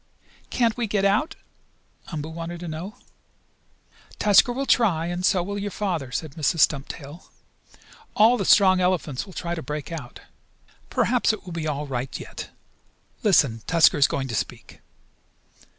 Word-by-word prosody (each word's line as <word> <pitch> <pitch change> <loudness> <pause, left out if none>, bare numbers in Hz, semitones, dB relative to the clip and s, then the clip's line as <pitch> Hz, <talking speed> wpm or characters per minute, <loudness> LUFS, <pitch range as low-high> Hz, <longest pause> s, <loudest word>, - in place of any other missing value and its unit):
"Can't 235 -2 +1
we 235 -2 -1
get 200 -1 0
out?" 220 +12 +1 0.7
Umboo 155 -2 -5
wanted 170 +1 -6
to 175 - -6
know. 170 +7 -6 1.2
"Tusker 210 +4 +5
will 270 +3 -2
try, 190 -12 +2
and 175 +1 -3
so 185 -2 +3
will 200 +2 -4
your 205 +1 -3
father," 175 -11 -3
said 150 +4 -4
Mrs. 160 +2 0
Stumptail. 145 +2 -1 0.9
"All 225 +4 +6
the 215 - -2
strong 185 -1 +5
elephants 180 -4 -1
will 190 - -12
try 170 0 -4
to 165 - -4
break 150 +3 -6
out. 145 -7 -8 0.7
Perhaps 240 -2 +2
it 215 - -8
will 180 - -8
be 165 -2 -3
all 150 -1 -2
right 130 -1 -4
yet. - - -8 0.7
Listen, 145 - +3
Tusker 165 -3 +4
is 140 - +6
going 135 -1 -3
to 120 - -6
speak." 105 - -5
175 Hz, 155 wpm, -24 LUFS, 150-200 Hz, 1.2 s, All